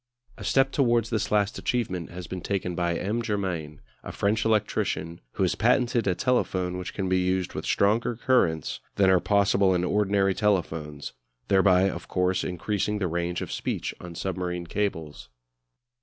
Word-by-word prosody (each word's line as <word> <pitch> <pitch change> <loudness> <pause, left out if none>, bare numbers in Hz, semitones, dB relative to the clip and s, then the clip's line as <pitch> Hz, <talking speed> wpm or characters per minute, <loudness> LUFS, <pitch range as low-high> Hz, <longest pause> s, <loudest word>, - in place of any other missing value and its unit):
A - - -10
step 135 0 +3
towards 120 -4 +2
this 110 - -1
last 105 -1 +1
achievement 95 -9 -2
has 90 +1 -7
been 90 +1 -6
taken 95 -1 -2
by 85 -1 0
M. 105 +5 -1
Germain, 95 -9 -3 0.2
a - - -7
French 110 +2 0
electrician, 100 -6 0
who - - 0
has - - +2
patented 120 -3 +2
a 90 - +2
telephone 90 -5 0
which 90 - -6
can 95 -2 -2
be 95 0 +2
used 90 0 0
with - - -5
stronger 110 +4 +2
currents 110 - +1 0.2
than 95 -2 +4
are 95 - +5
possible 100 -1 +3
in 90 - 0
ordinary 100 0 +2
telephones; 80 - -1 0.4
thereby, 95 -1 +5
of 85 -3 -5
course, 90 0 0
increasing 105 +3 -2
the 100 - -1
range 85 +1 -2
of - - -7
speech - - -3
on 85 -1 -9
submarine 90 -1 -3
cables. 80 -8 -3
95 Hz, 165 wpm, -26 LUFS, 90-105 Hz, 0.4 s, are